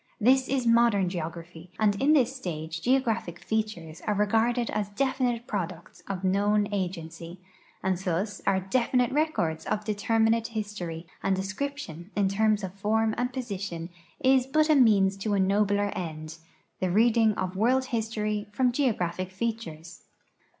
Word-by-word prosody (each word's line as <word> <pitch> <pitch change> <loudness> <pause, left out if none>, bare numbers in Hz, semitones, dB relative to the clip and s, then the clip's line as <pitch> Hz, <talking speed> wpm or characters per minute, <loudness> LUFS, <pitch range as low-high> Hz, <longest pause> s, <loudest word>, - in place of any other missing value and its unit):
This 260 +4 +4
is 265 -2 0
modern 230 -5 +4
geogra])h\"; 170 0 -7
and 205 -1 +2
in 290 +3 +5
this 265 -3 +3
stage 165 - -5
geographic 230 -8 0
features 180 -7 -3
are 210 - +2
regarded 225 +4 +1
as 205 -2 -2
definite 245 0 0
products 180 -5 -5
of 195 -1 -4
known 205 +2 +2
agency, 175 -2 -4 0.4
and 190 -1 +1
thus 190 +2 -2
as 190 -1 +2
definite 250 0 +2
records 260 - 0
ot'determinate 220 +2 +1
history, 205 -7 -5 0.2
and 195 -1 +1
de 190 - -2
scription 205 - -5
in 200 -2 +2
terms 210 +1 +2
of 185 -1 -4
form 220 +2 +1
and 245 +1 -1
position 195 -9 -5 0.3
is 260 -1 +3
but 310 +3 +3
a - - +6
means 200 -7 +4
to 205 +1 -1
a - - +1
nobler 205 +1 +2
end, 160 -1 -6 0.4
the 185 - 0
reading 225 +2 +4
of 185 -1 -3
world 255 +6 +2
history 215 -2 -1
from 250 +4 +2
geographic 185 - -1
features. 190 -6 -5
210 Hz, 145 wpm, -27 LUFS, 185-235 Hz, 0.4 s, a